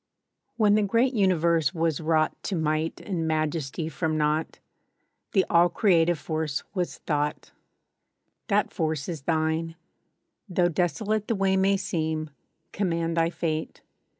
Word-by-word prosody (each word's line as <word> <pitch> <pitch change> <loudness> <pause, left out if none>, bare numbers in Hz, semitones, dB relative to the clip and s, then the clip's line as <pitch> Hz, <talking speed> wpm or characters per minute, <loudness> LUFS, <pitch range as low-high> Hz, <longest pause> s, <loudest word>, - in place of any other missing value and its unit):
WHEN 210 -3 +4
the 215 - +4
great 230 +6 +2
universe 170 - +2
was 165 -2 0
wrought 155 -1 +2
To 195 - -1
might 155 0 -1
and 170 -5 -2
majesty 155 -1 -1
from 160 -1 -2
naught, 150 +1 0 0.8
The 190 - +4
all 170 +1 +4
creative 175 -4 +3
force 155 -2 -3
was— 180 -3 -2
Thought. 150 -1 -1 1.0
That - - +1
force 155 -3 -1
is 165 -5 -4
thine. 160 +2 -1 0.7
Though 175 -1 +2
desolate 200 +6 -1
The 230 - 0
way 195 -1 +2
may 195 +1 +3
seem, 155 -3 -2 0.4
command 170 -4 -1
thy 165 0 +2
fate. 160 -2 -3
165 Hz, 130 wpm, -26 LUFS, 155-185 Hz, 1.0 s, WHEN